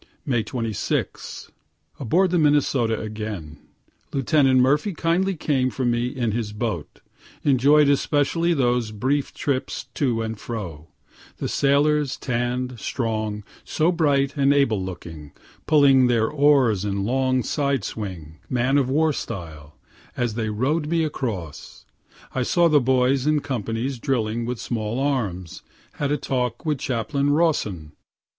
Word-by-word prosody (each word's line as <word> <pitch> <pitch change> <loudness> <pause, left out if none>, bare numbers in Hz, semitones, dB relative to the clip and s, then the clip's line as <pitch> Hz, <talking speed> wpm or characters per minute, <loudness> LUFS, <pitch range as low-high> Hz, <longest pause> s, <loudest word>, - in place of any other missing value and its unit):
May 120 -5 +1
26. 115 -1 -3 0.5
Aboard 170 - +2
the 180 - +2
Minnesota 140 -7 +2
again. 105 -9 -6 0.5
Lieut. 135 -1 -3 0.2
Murphy 145 +10 +3
kindly 180 +4 +1
came 135 -5 0
for 130 0 -3
me 120 0 +1
in 125 -4 -2
his 105 -1 -3
boat. 105 -8 -4 0.4
Enjoy'd 140 +1 +5
specially 165 +4 +1
those 120 -4 +1
brief 130 +7 -1
trips 135 -3 -2
to 120 -5 0
and 110 -1 -5
fro 85 -10 -6 0.5
the - - -3
sailors, 145 0 +2
tann'd, 125 0 -2
strong, 110 -3 -2 0.2
so 160 +3 +1
bright 140 -5 +1
and 140 -1 +3
able 115 -9 +2
looking, 80 -5 -8 0.3
pulling 140 -4 +5
their 115 -2 +2
oars 140 -9 +3
in 100 -1 -2
long 130 +1 +1
side 140 -3 0
swing, 85 -7 -6
man 130 +3 +2
of 130 -2 0
war 155 +3 +2
style, 80 - -7 0.4
as 120 -3 0
they 110 -1 -2
row'd 140 +9 0
me 165 +1 +1
across. 110 - -5 0.5
I 130 - -1
saw 170 +7 +3
the 150 -3 +4
boys 130 +2 +2
in 150 -1 +2
companies 120 0 -3
drilling 115 -3 -1
with 125 +1 -3
small 115 0 -3
arms; 105 - -2 0.3
had 145 -1 -2
a 150 - +2
talk 125 -2 -2
with 150 -3 0
Chaplain 130 +4 -1
Rawson. 125 - 0
125 Hz, 135 wpm, -23 LUFS, 110-145 Hz, 0.5 s, Enjoy'd